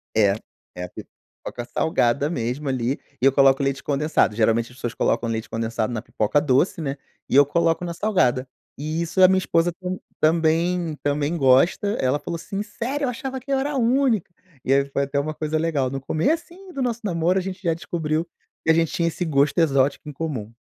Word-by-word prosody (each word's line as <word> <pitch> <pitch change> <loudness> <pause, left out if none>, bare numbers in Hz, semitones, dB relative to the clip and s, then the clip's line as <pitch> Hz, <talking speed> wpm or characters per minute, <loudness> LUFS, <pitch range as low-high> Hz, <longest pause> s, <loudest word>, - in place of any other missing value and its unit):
É, 105 -3 +4 0.4
é 90 - -5
a 90 - -6
pipoca 120 +6 -10
salgada 140 0 +1
mesmo 130 -1 -3
ali, 130 +1 -1 0.2
eu 135 +2 +5
coloco 135 0 +4
leite 135 0 -1
condensado, 145 -6 +1
geralmente 115 +2 +2
as 125 - -17
pessoas 120 -2 -4
colocam 115 - 0
leite 110 -1 -3
condensado 115 0 -2
na 110 - -3
pipoca 110 +8 0
doce, 150 +5 +2
né, 140 -2 -3 0.3
e - - 0
eu 145 +1 +8
coloco 165 +3 +1
na 170 - -4
salgada, 135 - +1 0.3
e 155 +3 -3
isso 170 +3 0
a - - +10
minha 190 +1 +3
esposa 175 -1 +1
tam 185 0 -3 0.2
também 165 +1 +2
também 145 +2 0
gosta, 135 +8 +4
ela 130 +3 +1
falou 170 - -5
assim: 195 +4 -5
“Sério? 250 +7 -3
Eu - - 0
achava 265 +2 -4
que 270 +3 -8
era 275 +2 +1
a 285 - -2
única”, 245 -4 +2 0.3
e 135 - +2
aí 140 0 +3
foi 140 0 -1
até 140 +1 -1
uma 155 +2 -2
coisa 155 0 -2
legal, 155 -5 0
no 135 +1 -4
comecinho 335 - -2
do 275 - -3
nosso 240 -2 -1
namoro, 175 -1 +1
a - - -2
gente 190 0 -6
já 170 -2 +2
descobriu 160 -1 -2 0.4
que - - -2
a - - +6
gente 165 -1 +2
tinha 170 - +1
esse 170 +2 -2
gosto 145 -2 +2
exótico 140 -1 +2
em - - -5
comum. 135 -8 -4
155 Hz, 205 wpm, -23 LUFS, 135-180 Hz, 0.4 s, a